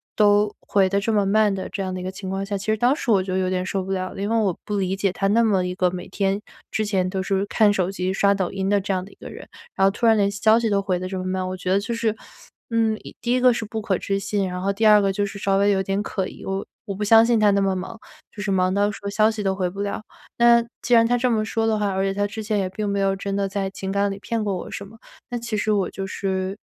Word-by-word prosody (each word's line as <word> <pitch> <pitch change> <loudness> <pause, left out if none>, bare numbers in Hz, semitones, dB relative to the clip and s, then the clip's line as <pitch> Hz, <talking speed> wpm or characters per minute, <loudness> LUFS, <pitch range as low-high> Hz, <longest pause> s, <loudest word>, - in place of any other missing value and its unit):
都 205 0 +3
回 195 -2 +2
得 200 +1 0
这 225 - 0
么 205 -2 +2
慢 210 0 +3
的 190 -1 -4
这 195 - -4
样 185 -1 -3
的 185 - -4
一 - - -6
个 185 - -3
情 190 0 -7
况 195 +1 -2
下， 200 0 -3
其 195 - -8
实 215 0 +2
当 245 +5 +3
时 245 - -1
我 195 -3 +4
就 185 0 -3
有 185 -1 0
点 185 0 -1
受 190 0 -2
不 195 - -6
了 185 -1 -2
了， 195 - -7
因 205 - -1
为 230 - +2
我 195 -6 +1
不 210 -1 -3
理 190 -1 0
解 195 -1 0
他 195 +2 -1
那 230 +3 +3
么 195 -5 +2
一 180 - -3
个 180 -1 +1
每 180 0 -6
天 195 +1 -1 0.3
之 215 - 0
前 190 -3 0
都 190 0 -2
是 195 +1 0
看 210 -1 +3
手 190 -2 0
机、 185 -1 -2
刷 200 +1 +3
抖 190 -3 -1
音 195 0 -2
的 205 0 +3
这 195 0 -2
样 185 -1 -1
的 200 - -13
一 - - -18
个 - - -10
人， - - -10 0.3
然 195 - +3
后 195 - +4
突 230 +4 -2
然 225 -1 +6
连 200 -1 +2
消 215 +2 +4
息 230 -1 0
都 200 -1 +2
回 190 -2 -1
得 185 +1 -5
这 190 - -4
么 185 - -5
慢。 185 0 -2
我 185 - -5
觉 185 0 -3
得 195 - +4
就 225 +4 -4
是， 225 -1 0 0.5
嗯， 225 -2 +1
一 - - -11
第 240 +1 -1
一 255 - +2
个 250 0 +6
是 230 -1 -3
不 220 +1 -5
可 195 -3 0
置 195 +2 -2
信， 200 -1 -1
然 180 0 -4
后 195 +1 +1
第 220 +3 -1
二 210 -1 +7
个 195 -1 +1
就 205 +1 -1
是 200 0 -7
稍 195 0 +1
微 200 +1 +3
有 190 -1 +2
点 195 +1 -1
可 190 -2 -3
疑。 - - -11
我 195 0 -2 0.2
我 200 - -4
不 210 - -3
相 225 +2 +6
信 235 -1 +3
他 210 -1 +5
那 200 - +2
么 195 -1 +1
忙， 190 +5 -6 0.4
就 205 - -6
是 195 - -1
忙 185 -1 +2
到 205 +1 +2
说 200 0 -6
消 215 +2 +3
息 215 - -5
都 190 0 0
回 185 -1 -1
不 195 +3 -6
了。 205 +1 -3 0.4
那 235 0 +6 0.2
既 245 - +1
然 230 -1 +6
他 245 +1 +2
这 245 0 +1
么 215 -1 +1
说 225 +1 -1
的 220 -1 +1
话， 205 -1 0
而 190 0 -1
且 195 0 0
他 205 +1 0
之 220 +1 -6
前 210 -1 0
也 185 - -1
并 205 +2 -4
没 200 0 -1
有 195 0 +1
真 195 0 -4
的 200 0 0
在 195 0 -2
情 190 0 -5
感 200 0 +1
里 195 - -6
骗 225 +1 -2
过 200 -2 -1
我 - - -7
什 200 - -6
么， 225 - -16 0.3
那 245 - -3
其 235 -2 -4
实 215 +1 0
我 200 -3 +1
就 195 - -5
是 190 0 -3
200 Hz, 345 characters per minute, -23 LUFS, 190-215 Hz, 0.5 s, 二